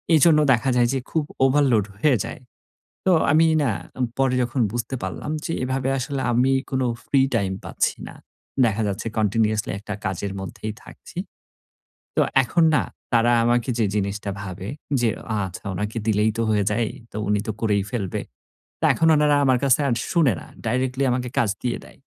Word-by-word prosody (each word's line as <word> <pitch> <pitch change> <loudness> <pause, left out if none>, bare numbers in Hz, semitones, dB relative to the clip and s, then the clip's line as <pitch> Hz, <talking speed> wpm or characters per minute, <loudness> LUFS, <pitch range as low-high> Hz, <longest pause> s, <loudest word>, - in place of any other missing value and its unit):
এজন্য 155 0 +6
দেখা 120 +2 +1
যায় 120 -1 +4
যে, 135 - 0
খুব 160 - +1 0.2
ওভারলোড 130 -6 +3
হয়ে 135 +5 +3
যায়। - - -8 0.6
তো 190 - +4 0.2
আমি 160 +2 +5 0.2
না 130 - +2 0.3
উ - - +3
পরে 135 -1 +2
যখন 125 +2 -1
বুঝতে 120 +2 -3
পারলাম 95 - -4
যে - - -2
এভাবে 130 +1 -1
আসলে 135 +1 -3
আমি 125 +3 +3 0.2
কোনো 130 -2 0 0.2
ফ্রি 135 - +3
টাইম 100 -4 +1
পাচ্ছি - - 0
না। - - -10 0.5
দেখা 110 -1 0
যাচ্ছে 100 +3 -3
কন্টিনিউয়াসলি 110 0 +1
একটা 105 +1 -6
কাজের 95 +1 -2
মধ্যেই 105 +3 -5
থাকছি। - - -14 1.0
তো - - +4 0.2
এখন 170 +7 +2
না - - +3 0.3
তারা 120 0 +4
আমাকে 120 +1 +1
যে 110 - +3
জিনিসটা 100 0 -2
ভাবে 95 -1 -6 0.3
যে 120 - +3 0.2
অ - - 0
"আচ্ছা 90 - -10
ওনাকে 105 +4 -3
দিলেই 105 0 +3
তো - - +1
হয়ে 105 -1 +2
যায়। 115 +2 +1 0.2
তো - - -7
উনি 105 0 +2
তো - - 0
করেই 105 -3 +2
ফেলবে।" 100 -8 -2 0.6
তা - - +3
এখন 165 - +2
ওনারা 150 -1 +4
আমার 130 -1 +4
কাছে 135 -1 +4 0.3
শুনে 160 - +4
না। - - -11 0.2
ডাইরেক্টলি 130 +3 0
আমাকে 125 0 -1
কাজ 115 - +2
দিয়ে 125 - -1
দেয়। - - -16
120 Hz, 175 wpm, -23 LUFS, 105-135 Hz, 1.0 s, এজন্য